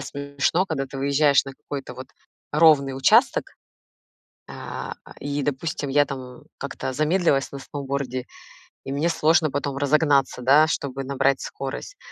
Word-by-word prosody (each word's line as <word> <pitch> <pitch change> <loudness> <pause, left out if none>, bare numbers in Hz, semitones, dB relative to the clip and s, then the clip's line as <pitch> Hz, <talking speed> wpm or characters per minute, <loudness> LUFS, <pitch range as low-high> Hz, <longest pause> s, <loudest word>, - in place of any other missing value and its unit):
смешно, 140 +5 -1
когда 135 -6 -2
ты 135 +1 -8
выезжаешь 140 +1 +3
на 135 - -8
какой-то 135 0 -7
вот 130 - -9 0.4
ровный 145 -4 +4
участок, 135 - +4 1.0
а, - - -6
а, - - -14
и, 145 0 -3
допустим, 145 +1 -3
я 145 +1 +4
там 130 -2 -8 0.2
как-то 140 -1 -5
замедлилась 155 -1 +1
на 140 - -7
сноуборде, 135 -2 -4 0.6
и 135 - -4
мне 155 +4 +1
сложно 160 -1 +3
потом 140 -1 -2
разогнаться, 140 -2 +2
да, 145 +5 +5
чтобы 135 -3 -3
набрать 135 0 +1
скорость, 135 - -6
140 Hz, 140 wpm, -23 LUFS, 135-150 Hz, 1.0 s, да